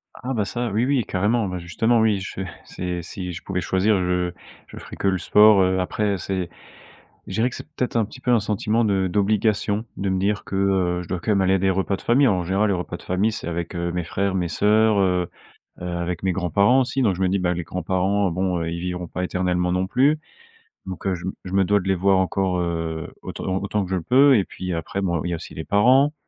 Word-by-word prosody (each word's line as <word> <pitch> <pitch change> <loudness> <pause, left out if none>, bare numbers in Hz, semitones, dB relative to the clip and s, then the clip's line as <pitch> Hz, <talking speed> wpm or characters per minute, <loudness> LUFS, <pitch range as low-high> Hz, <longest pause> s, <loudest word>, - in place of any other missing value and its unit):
Ah - - -13
ah, - - 0
bah, 110 -4 0
ça 120 +5 -3
oui 110 +4 +1
oui 135 -2 +1
carrément. 105 +4 0
Bah, 90 -1 -4
justement 110 +7 +1
oui, 110 -3 +2
je 95 0 -6 0.2
c'est 90 -1 -4
si 90 +1 -6
je 85 - -7
pouvais 95 -2 -2
choisir, 95 +4 +2
je 90 -1 0 0.4
je - - -12
ferais - - -9
que - - -1
le 95 -1 +2
sport. 95 0 +5
Après 100 +2 -1
c'est 95 -1 -3 0.8
je - - -6
dirais 115 +5 +1
que - - -9
c'est - - -9
peut-être 125 -2 -2
un 115 -2 +3
petit 110 +5 -13
peu 125 - 0
un 120 - +5
sentiment 110 +2 0
de 95 -2 +1
d'obligation, 105 +2 +1
de 100 - -1
me 95 0 0
dire 100 +2 0
que, - - -5
heu, 95 -2 +1
je - - -12
dois 90 - -3
quand 95 - -5
même 100 -2 +3
aller 95 0 +3
à - - +3
des 95 +1 +2
repas 95 +1 0
de - - -10
famille. 130 +4 +3
Alors 95 -6 +2
en - - -2
général, 95 +5 +1
les 100 - +2
repas 90 0 -5
de - - -16
famille, 95 +5 +1
c'est 105 - -6
avec, 85 +1 -4
heu, 85 0 -2
mes 90 0 -2
frères, 95 +4 -1
mes 90 -2 0
sœurs, 105 +5 +3
heu, 90 -2 +1 0.5
heu, 90 - -5
avec 85 0 -3
mes 95 -1 +1
grands-parents 100 +8 +3
aussi, 130 +1 -1
donc 105 -6 +2
je 95 - -3
me 95 - +3
dis: 100 - +1
«Ben, 90 -1 0
les 85 - -3
grands-parents, 95 +3 0
bon, 90 0 -1
ils 85 +1 -3
vivront 90 0 -4
pas 90 - -3
éternellement 90 -1 0
non 90 +1 0
plus». 140 +9 +3 0.7
Donc, 95 -1 -7
je 85 -1 -6
me 95 - -2
je 90 - -8
me 95 0 +3
dois 100 +1 +2
de 95 - -7
les 95 - +3
voir 95 +2 +3
encore, 95 -1 0
heu, 80 -2 -3
autant 95 0 -3
autant 100 +1 -1
que 90 - -7
je - - +1
le - - -3
peux 135 - +5
et 100 - +1
puis, 90 -1 -5
après, 85 +4 -3
bon, 85 -4 0
il - - -1
y - - -2
a - - 0
aussi 85 - -9
les 80 - -6
parents 130 +8 +4
95 Hz, 255 wpm, -23 LUFS, 90-105 Hz, 0.8 s, sport